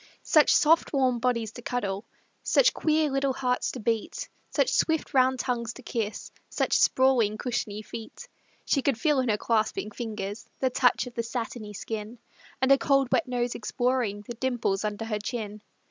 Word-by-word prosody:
Such 305 Hz, -2 st, +5 dB
soft, 320 Hz, +2 st, +4 dB
warm 260 Hz, -3 st, +2 dB
bodies 235 Hz, -3 st, 0 dB
to 245 Hz, -, -10 dB
cuddle, 205 Hz, -4 st, -3 dB, 0.4 s
Such -, -, +4 dB
queer 310 Hz, -2 st, +1 dB
little 275 Hz, 0 st, +1 dB
hearts 250 Hz, -1 st, 0 dB
to 255 Hz, -, -6 dB
beat, 230 Hz, -, -2 dB, 0.2 s
Such -, -, +1 dB
swift 320 Hz, -2 st, +1 dB
round 260 Hz, -1 st, +4 dB
tongues 235 Hz, -2 st, -2 dB
to 260 Hz, -, -13 dB
kiss, 220 Hz, -3 st, -4 dB, 0.2 s
Such -, -, -1 dB
sprawling, 250 Hz, -5 st, +3 dB
cushiony 215 Hz, -3 st, -3 dB
feet; 225 Hz, +1 st, -9 dB, 0.4 s
She 275 Hz, -, +2 dB
could 260 Hz, -3 st, 0 dB
feel 300 Hz, -4 st, +2 dB
in 255 Hz, -2 st, 0 dB
her 210 Hz, -, +2 dB
clasping 215 Hz, -1 st, 0 dB
fingers 210 Hz, -2 st, -5 dB
The 260 Hz, -1 st, 0 dB
touch 250 Hz, +1 st, +3 dB
of 250 Hz, -, -9 dB
the 235 Hz, -, -1 dB
satiny 230 Hz, -2 st, -5 dB
skin, 215 Hz, +3 st, -6 dB, 0.5 s
And 265 Hz, -, +4 dB
a 275 Hz, -, +6 dB
cold, 275 Hz, -2 st, +2 dB
wet 320 Hz, -, +2 dB
nose 245 Hz, -1 st, -1 dB
exploring 245 Hz, -3 st, -1 dB
The 240 Hz, -, -5 dB
dimples 235 Hz, -5 st, -1 dB
under 210 Hz, +1 st, -3 dB
her 215 Hz, -2 st, -2 dB
chin. 210 Hz, -1 st, -5 dB
245 Hz, 175 wpm, -27 LUFS, 215-260 Hz, 0.5 s, a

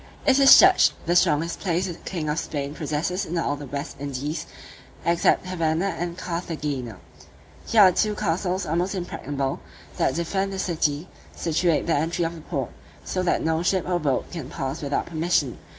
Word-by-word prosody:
It 275 Hz, 0 st, +5 dB
is 275 Hz, -1 st, +10 dB
judged 370 Hz, 0 st, +6 dB
the 175 Hz, -, +1 dB
strongest 165 Hz, -1 st, +2 dB
place 180 Hz, -1 st, 0 dB
the 180 Hz, -, -4 dB
king 165 Hz, -1 st, -5 dB
of 150 Hz, +2 st, 0 dB
Spain 140 Hz, -1 st, -4 dB
possesses 160 Hz, +5 st, -2 dB
in 175 Hz, -2 st, -4 dB
all 145 Hz, -3 st, 0 dB
the 145 Hz, -1 st, -8 dB
West 140 Hz, +2 st, -5 dB
Indies, 145 Hz, +3 st, -4 dB, 0.6 s
except 170 Hz, +1 st, +2 dB
Havanna 175 Hz, +1 st, 0 dB
and 170 Hz, +1 st, -4 dB
Carthagena. 150 Hz, -, -4 dB, 0.7 s
Here 220 Hz, -1 st, +5 dB
are 185 Hz, -, +7 dB
two 210 Hz, +3 st, +1 dB
castles 185 Hz, -1 st, -1 dB
almost 175 Hz, +5 st, -1 dB
impregnable, 145 Hz, -6 st, -3 dB, 0.4 s
that -, -, +1 dB
defend 190 Hz, +4 st, -1 dB
the -, -, -4 dB
city, 160 Hz, -3 st, -1 dB, 0.3 s
situate 165 Hz, 0 st, +1 dB
at -, -, -8 dB
the 170 Hz, -, +1 dB
entry 165 Hz, +3 st, 0 dB
of 165 Hz, -, -3 dB
the 165 Hz, -, -10 dB
port, 140 Hz, -6 st, -4 dB, 0.3 s
so 185 Hz, -, -2 dB
that 180 Hz, -, +1 dB
no 160 Hz, 0 st, +1 dB
ship 185 Hz, 0 st, 0 dB
or 180 Hz, -1 st, +1 dB
boat 140 Hz, -5 st, -1 dB
can 155 Hz, -7 st, -6 dB
pass 135 Hz, -1 st, -4 dB
without 145 Hz, -1 st, -1 dB
permission. 160 Hz, -5 st, 0 dB
165 Hz, 180 wpm, -24 LUFS, 150-180 Hz, 0.7 s, is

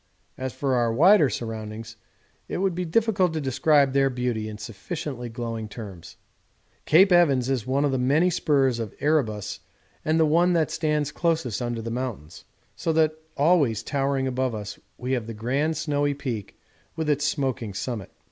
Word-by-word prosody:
As 130 Hz, 0 st, -4 dB
for 135 Hz, 0 st, -1 dB
our 120 Hz, -2 st, +2 dB
wider 160 Hz, -, +6 dB
surroundings 110 Hz, -1 st, -6 dB, 0.5 s
it -, -, -3 dB
would 190 Hz, 0 st, +1 dB
be 180 Hz, +1 st, -3 dB
difficult 190 Hz, -1 st, +2 dB
to 160 Hz, -, -1 dB
describe 140 Hz, 0 st, +3 dB
their 135 Hz, 0 st, +3 dB
beauty 120 Hz, -4 st, -2 dB
in 105 Hz, -, -7 dB
sufficiently 125 Hz, -, -6 dB
glowing 115 Hz, -2 st, -5 dB
terms. 100 Hz, -6 st, -9 dB, 0.7 s
Cape 185 Hz, +5 st, +6 dB
Evans 140 Hz, -8 st, +4 dB
is 125 Hz, -3 st, -1 dB
one 140 Hz, +3 st, +1 dB
of 145 Hz, -, +1 dB
the 130 Hz, -, 0 dB
many 150 Hz, +8 st, +3 dB
spurs 135 Hz, -7 st, +2 dB
of 110 Hz, -4 st, -5 dB
Erebus 110 Hz, -10 st, 0 dB, 0.4 s
and 155 Hz, +1 st, +1 dB
the 160 Hz, -, +5 dB
one 170 Hz, +4 st, +3 dB
that 165 Hz, -2 st, +1 dB
stands 150 Hz, -2 st, 0 dB
closest 160 Hz, -, -1 dB
under 120 Hz, -2 st, -3 dB
the 115 Hz, -, -4 dB
mountain, 120 Hz, -, -4 dB, 0.5 s
so 165 Hz, -, -1 dB
that 155 Hz, -1 st, +3 dB, 0.2 s
always 145 Hz, -, +3 dB
towering 135 Hz, 0 st, 0 dB
above 130 Hz, -2 st, -1 dB
us 105 Hz, -1 st, -7 dB, 0.2 s
we 125 Hz, +1 st, -4 dB
have 120 Hz, -4 st, -1 dB
the 115 Hz, -, -6 dB
grand 140 Hz, +8 st, -1 dB
snowy 145 Hz, -2 st, 0 dB
peak 120 Hz, -8 st, -5 dB, 0.4 s
with 160 Hz, -1 st, -2 dB
its 145 Hz, -1 st, +1 dB
smoking 130 Hz, -, -1 dB
summit. 110 Hz, -2 st, -4 dB
135 Hz, 170 wpm, -25 LUFS, 115-155 Hz, 0.7 s, wider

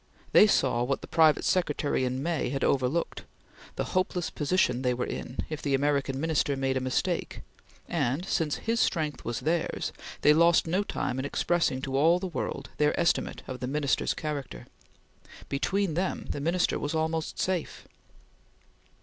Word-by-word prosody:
They 215 Hz, -, +8 dB
saw 130 Hz, -, +2 dB
what 135 Hz, +3 st, -1 dB
the -, -, -9 dB
private 160 Hz, -2 st, +4 dB
secretary 150 Hz, -7 st, +1 dB
in 130 Hz, +2 st, -2 dB
May 165 Hz, -4 st, -1 dB
had 135 Hz, +1 st, -2 dB
overlooked, 140 Hz, +5 st, 0 dB, 0.5 s
the -, -, -1 dB
hopeless 185 Hz, -2 st, 0 dB
position 145 Hz, -5 st, +1 dB
they 125 Hz, -1 st, +1 dB
were 125 Hz, -, -2 dB
in 125 Hz, -, -6 dB
if 155 Hz, -1 st, -5 dB
the 140 Hz, -2 st, +1 dB
American 140 Hz, -1 st, 0 dB
Minister 150 Hz, -3 st, +1 dB
made 135 Hz, 0 st, 0 dB
a -, -, +1 dB
mistake, 130 Hz, 0 st, -2 dB, 0.5 s
and, 150 Hz, 0 st, -1 dB
since 160 Hz, -6 st, 0 dB
his 230 Hz, 0 st, -1 dB
strength 150 Hz, -9 st, 0 dB
was 120 Hz, -1 st, -3 dB
theirs, 165 Hz, +1 st, -1 dB, 0.3 s
they 150 Hz, -, +6 dB
lost 170 Hz, +2 st, +5 dB
no 180 Hz, +4 st, +1 dB
time 130 Hz, -9 st, -3 dB
in 130 Hz, -, -2 dB
expressing 145 Hz, -3 st, 0 dB
to 135 Hz, -1 st, -3 dB
all 160 Hz, +5 st, +5 dB
the 185 Hz, -, -4 dB
world 145 Hz, -5 st, -4 dB
their 150 Hz, 0 st, +2 dB
estimate 170 Hz, 0 st, 0 dB
of 130 Hz, -1 st, -6 dB
the 125 Hz, -, -3 dB
Minister's 140 Hz, -3 st, 0 dB
character. 145 Hz, -, -5 dB, 0.8 s
Between 190 Hz, +5 st, 0 dB
them 180 Hz, +4 st, -2 dB
the 145 Hz, -, -4 dB
Minister 175 Hz, +4 st, +1 dB
was 145 Hz, +2 st, -2 dB
almost 160 Hz, 0 st, -1 dB
safe. 185 Hz, -4 st, -2 dB
150 Hz, 165 wpm, -28 LUFS, 135-170 Hz, 0.8 s, They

